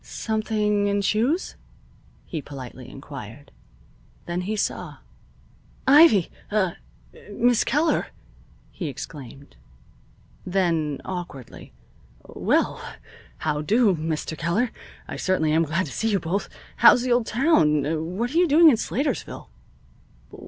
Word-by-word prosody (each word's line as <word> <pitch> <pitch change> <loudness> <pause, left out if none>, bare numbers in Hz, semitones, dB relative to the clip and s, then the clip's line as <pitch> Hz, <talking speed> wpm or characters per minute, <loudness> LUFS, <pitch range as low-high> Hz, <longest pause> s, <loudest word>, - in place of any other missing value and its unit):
"Something 215 -2 -1
in 200 0 0
shoes?" 245 - 0 0.7
he 160 - -5
politely 130 -3 -10
inquired. 135 -2 -10 0.7
Then 175 +1 -3
he 205 +4 -3
saw. 210 - -3 0.9
"Ivy! 275 - +6 0.2
ah 190 -5 0 0.5
Miss 240 +3 +2
Keller!" 300 +5 +1 0.6
he 175 - -5
exclaimed. 140 - -9 0.9
Then, 165 -6 0
awkwardly: 175 -9 -8 0.5
"Well, - - 0 0.6
how 150 -1 -2
do, 210 +4 +3
Mr. 160 0 -3
Keller. 170 +10 0 0.4
I - - -6
certainly 175 -5 +1
am 165 +1 +3
glad 170 +5 -1
to 140 - -9
see 225 - -1
you 200 -2 +1
both. 180 +5 -3 0.3
How's 245 - +7
the 255 - -1
old 240 -1 +2
town? 160 - +1
What 240 +4 -2
are - - 0
you 355 - +4
doing 315 +2 +7
in 235 - +2
Slatersville?" 275 +6 -3
185 Hz, 115 wpm, -24 LUFS, 155-225 Hz, 0.9 s, How's